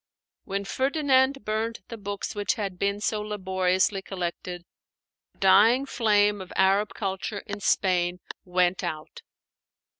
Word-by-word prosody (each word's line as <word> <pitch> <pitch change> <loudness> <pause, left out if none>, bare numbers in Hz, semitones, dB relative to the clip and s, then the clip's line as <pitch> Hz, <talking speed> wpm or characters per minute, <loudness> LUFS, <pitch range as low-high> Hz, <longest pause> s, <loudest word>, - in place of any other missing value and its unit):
When 200 0 -3
Ferdinand 270 0 +1
burned 220 +2 -2
the 230 - -6
books 200 0 -4
which 205 +4 0
had 195 -5 -4
been 200 +1 0
so 215 0 0
laboriously 190 -1 0
collected, 180 -1 -5 0.7
the - - -33
dying 215 +8 +5
flame 210 -5 +2
of 185 - -10
Arab 195 +2 +2
culture 195 +1 -4
in 205 -1 -6
Spain 180 -3 +1 0.3
went 180 0 +1
out. 155 -3 -5
200 Hz, 125 wpm, -26 LUFS, 185-215 Hz, 0.7 s, dying